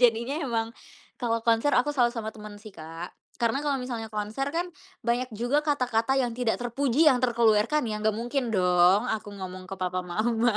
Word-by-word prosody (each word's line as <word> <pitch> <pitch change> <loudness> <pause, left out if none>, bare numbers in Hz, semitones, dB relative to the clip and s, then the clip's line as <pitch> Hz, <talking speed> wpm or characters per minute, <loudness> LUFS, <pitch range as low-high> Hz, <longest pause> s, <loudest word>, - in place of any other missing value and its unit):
jadinya 235 +2 +3
emang, 230 -4 -1 0.5
kalau 230 -1 -1
konser 230 +5 +3
aku 270 +4 +2
selalu 250 -4 +3
sama 220 -1 -4
teman 210 -1 -10
sih 210 0 -12
Kak, 165 +1 -8 0.2
karena 235 +4 +1
kalau 290 -2 0
misalnya 240 -3 -4
konser 215 +5 -3
kan 335 +4 -1 0.4
banyak 245 +2 0
juga 245 +7 +1
kata-kata 265 -4 +1
yang 250 -3 +1
tidak 235 -1 0
terpuji 250 +4 +1
yang 265 -5 +5
terkeluarkan 235 +3 +3
ya 215 -2 -3
gak 215 0 +1
mungkin 245 +2 -2
dong 180 -1 +4
aku 215 -1 -4
ngomong 185 -1 -7
ke 195 - -6
papa 185 0 -2
mama. 220 +5 +1
230 Hz, 180 wpm, -27 LUFS, 210-250 Hz, 0.5 s, yang